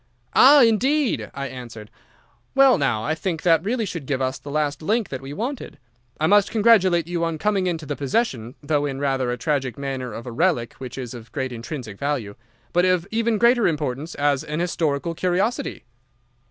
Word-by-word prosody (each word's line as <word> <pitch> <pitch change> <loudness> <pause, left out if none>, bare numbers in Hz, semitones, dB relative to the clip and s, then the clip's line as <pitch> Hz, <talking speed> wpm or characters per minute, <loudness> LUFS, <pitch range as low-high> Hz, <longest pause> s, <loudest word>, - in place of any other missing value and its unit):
"'Ah, 280 +1 +8
indeed!' 255 +5 +2
I 140 0 -4
answered. 115 -5 -9 0.6
'Well 270 -6 +6
now, 120 -6 0
I 155 - 0
think 165 0 -3
that 165 -2 +4
really 225 +2 -1
should 165 -8 -6
give 135 -3 -1
us 130 0 -2
the 145 - -10
last 150 +1 -1
link 215 +6 0
that 130 -1 -5
we 135 +1 -8
wanted. 235 - -5 0.4
I 155 - +1
must 205 +3 +4
congratulate 205 -7 +4
you 170 0 -2
on 165 -1 -1
coming 195 +1 0
into 165 -3 -3
the 145 - -3
possession, 135 - -1
though 145 -1 0
in 135 -1 -4
rather 135 -3 0
a 125 - -3
tragic 135 -6 -1
manner 135 -3 -4
of 115 +2 -8
a 125 - -6
relic 115 0 0
which 130 -1 -7
is 125 -3 -6
of 115 -2 -11
great 130 -1 -3
intrinsic 120 -3 -7
value, 140 -8 -2 0.4
but 175 0 +3
of 185 -1 +2
even 230 0 +1
greater 235 0 +4
importance 150 -1 -3
as 145 -1 +1
an 150 +1 -4
historical 165 -2 -1
curiosity. 185 +7 -1
155 Hz, 190 wpm, -23 LUFS, 130-190 Hz, 0.6 s, Ah